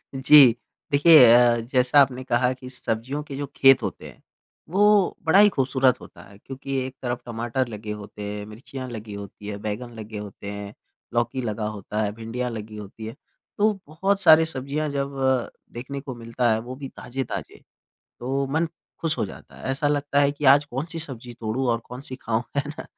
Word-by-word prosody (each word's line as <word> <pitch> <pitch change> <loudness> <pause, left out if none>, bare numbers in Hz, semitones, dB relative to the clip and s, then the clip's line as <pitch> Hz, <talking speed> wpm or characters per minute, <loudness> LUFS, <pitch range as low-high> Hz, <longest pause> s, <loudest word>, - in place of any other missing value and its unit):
जी। 130 -3 +7 0.4
देखिए 145 -1 +8
अ, 120 -1 +5
जैसा 130 +3 +5
आपने 130 -1 +1
कहा 125 0 +1
कि 130 0 -11
सब्जियों 130 +3 -3
के 145 -2 -8
जो 145 +1 -3
खेत 135 -1 +6
होते - - -5
हैं, - - -15 0.5
वो 205 +1 +4
बड़ा 185 +5 +5
ही 210 0 +8
खूबसूरत 130 -4 +2
होता - - -13
है। 100 - -16
क्योंकि 135 +3 -6
एक 130 0 -8
तरफ 120 -1 -3
टमाटर 120 +2 -2
लगे 105 -1 -7
होते 105 0 -9
हैं, 105 0 -5
मिर्चियाँ 130 +4 -8
लगी 110 -3 -7
होती 100 0 -9
है, 100 -1 -4
बैंगन 120 +3 -4
लगे 110 0 -7
होते 100 0 -7
हैं, 100 0 -7 0.4
लौकी 120 +2 0
लगा 110 -2 -3
होता 105 +2 -3
है, 105 - -1
भिंडियाँ 120 +2 -3
लगी 110 -1 -7
होती 105 +2 -9
है। 115 - -7 0.4
तो 215 +1 +4 0.2
बहुत 195 +6 0
सारी 160 -1 +7
सब्ज़ियाँ 150 +1 -3
जब 140 -1 -3 0.6
देखने 130 +4 -6
को 130 -3 -7
मिलता 115 0 -1
है 110 - +1
वो 125 +3 -7
भी 135 0 -7
ताज़े-ताज़े 130 0 -6 0.6
तो 135 +3 -1
मन 160 +2 +1 0.3
खुश 160 -1 0
हो - - 0
जाता - - -12
है। - - -13
ऐसा 145 +2 0
लगता 145 -1 +1
है 140 0 +4
कि 145 0 -5
आज 145 +1 +3
कौन 135 +3 -4
सी 165 - -4
सब्ज़ी 125 -6 -6
तोड़ूँ 115 +4 -2
और 115 - 0
कौन 125 +2 -9
सी 130 - -6
खाऊँ? 115 +1 -1
है 140 - +2
ना? 150 - -7
130 Hz, 195 wpm, -24 LUFS, 115-140 Hz, 0.6 s, देखिए